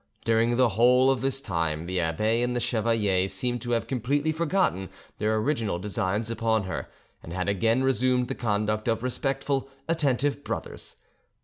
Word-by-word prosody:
During 115 +1 +2
the 130 -2 +4
whole 125 +5 +4
of 130 - -1
this 135 0 0
time 80 - -2
the 90 +1 -2
abbe 105 +8 +1
and 125 0 0
the - - +1
chevalier 110 -5 +1
seemed 120 +6 -2
to 120 - -4
have 115 - +1
completely 140 +5 0
forgotten 160 - 0 0.3
their 110 +1 +1
original 110 - 0
designs 105 +3 -2
upon 110 -1 +1
her, 95 - -5 0.3
and 80 - -10
had 90 +2 -2
again 115 +5 +2
resumed 130 -1 +2
the - - -2
conduct 110 -1 -1
of 115 0 0
respectful, 135 +1 -1 0.2
attentive 145 -3 0
brothers. - - -5
115 Hz, 165 wpm, -26 LUFS, 105-130 Hz, 0.3 s, the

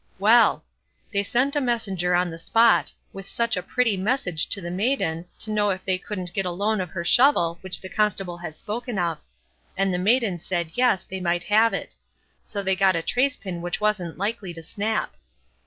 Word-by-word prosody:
Well! 225 +5 +5 0.5
they 200 -2 +1
sent 250 +8 0
a 290 - +2
messenger 195 -8 0
on 175 0 +1
the 165 - -8
spot, 225 +6 +4 0.2
with 195 0 -9
such 235 0 0
a 180 - -2
pretty 240 +1 +1
message 190 - 0
to - - +1
the 175 -2 -5
maiden, 180 -5 -1
to 215 - -4
know 210 -1 +2
if 190 -1 -3
they 185 -1 0
couldn't 185 -3 -6
get 195 - 0
the 180 -2 -3
loan 205 +3 0
of 180 - -4
her 170 -1 -4
shovel 170 -7 +4
which 190 -1 -2
the 185 - -8
Constable 195 -3 0
had 160 -3 -8
spoken 235 +1 -4
of; 170 -4 -1 0.6
and 195 -1 +1
the 180 - 0
maiden 210 -2 +2
said 170 -1 -3
"yes", 245 -7 +2
they 190 0 -6
might 175 -1 0
have 220 +2 +4
it; - - -4 0.5
so 200 -2 -4
they 190 0 +1
got 190 -1 +3
a 165 - -1
trace 255 +6 +1
pin 180 -4 -6
which 175 +2 -3
wasn't 210 -6 0
likely 200 -2 -3
to 165 - -9
snap. 215 +5 -2
195 Hz, 205 wpm, -24 LUFS, 175-220 Hz, 0.6 s, Well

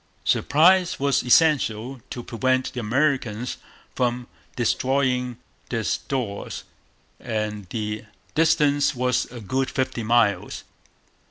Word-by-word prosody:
Surprise 180 +4 +3
was 140 -1 +2
essential, 125 -3 +2
to 120 - -6
prevent 130 +2 0
the 125 - -4
Americans 125 -1 0 0.4
from 125 0 -1 0.3
destroying 125 0 0 0.3
their 115 -2 -1
stores; 115 -7 -3 0.6
and 105 -3 -4
the 105 +1 -4 0.3
distance 150 -3 +3
was 125 0 +1
a 120 0 -10
good 130 +5 -1
fifty 130 -2 -2
miles. 110 -4 +1
125 Hz, 100 wpm, -24 LUFS, 115-135 Hz, 0.6 s, Surprise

